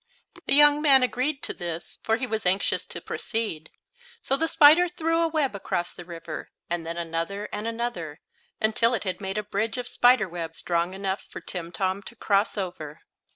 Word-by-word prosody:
The 275 - +4
young 295 0 +7
man 275 -4 +6
agreed 265 +3 -1
to - - -3
this, 170 -2 -5
for 225 0 +1
he 255 - -2
was 220 -3 -3
anxious 185 +2 +1
to - - -6
proceed. 215 -9 -3 0.5
So 270 - +2
the 325 +4 0
spider 320 +3 +7
threw 330 -1 0
a 335 - +3
web 305 -6 0
across 175 -3 -2
the 175 - -10
river, 165 -2 -7 0.2
and 175 -1 -1
then 170 +1 -4
another, 170 +5 -3
and 210 +2 -3
another, 225 -10 -4 0.4
until 230 +2 +3
it - - -3
had 190 0 -3
made 195 +1 -3
a 210 - -1
bridge 210 +3 -2
of 250 -1 -3
spider 245 -4 +4
web 165 -2 -6
strong 170 +2 -1
enough 195 0 -3
for - - -7
Timtom 185 +2 -3
to 235 - -10
cross 205 -1 +1
over. 175 -6 -5
210 Hz, 190 wpm, -26 LUFS, 175-250 Hz, 0.5 s, young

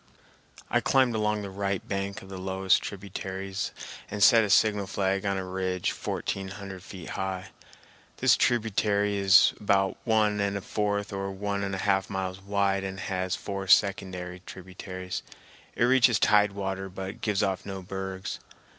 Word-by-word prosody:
I - - +2
climbed 130 -3 +3
along 105 -1 0
the 100 - -6
right 100 0 -2
bank 100 0 -3
of 95 - -13
the 95 -1 -7
lowest 95 0 +2
of - - -6
the - - -4
tributaries 95 0 -5 0.4
and 105 0 0
set 115 +1 +7
a 105 - -1
signal 105 -1 +3
flag 95 +1 0
on 100 -1 0
a 95 - -3
ridge 95 -1 -1
fourteen 95 -1 -3
hundred 95 -1 -8
feet 95 -3 -9
high. 95 -1 -4 0.7
This - - +5
tributary 105 -3 +1
is 95 -1 +6
about 100 -2 +2
one 105 -2 +2
and 100 0 0
a - - -5
fourth 100 0 -2
or 100 0 -3
one 100 +1 -3
and 95 -1 -2
a 95 - -4
half 95 -1 +2
miles 95 -1 -3
wide 100 0 0
and 95 0 -5
has 95 -1 -2
four 100 -1 -5
secondary 90 -2 +2
tributaries. 95 0 -6 0.5
It - - +1
reaches 125 -2 +5
tide 105 +1 +4
water 95 -1 -3
but 95 +1 -7
gives 105 -2 +1
off 95 -2 -1
no 95 -1 -6
bergs. 95 0 -5
95 Hz, 170 wpm, -28 LUFS, 95-100 Hz, 0.7 s, set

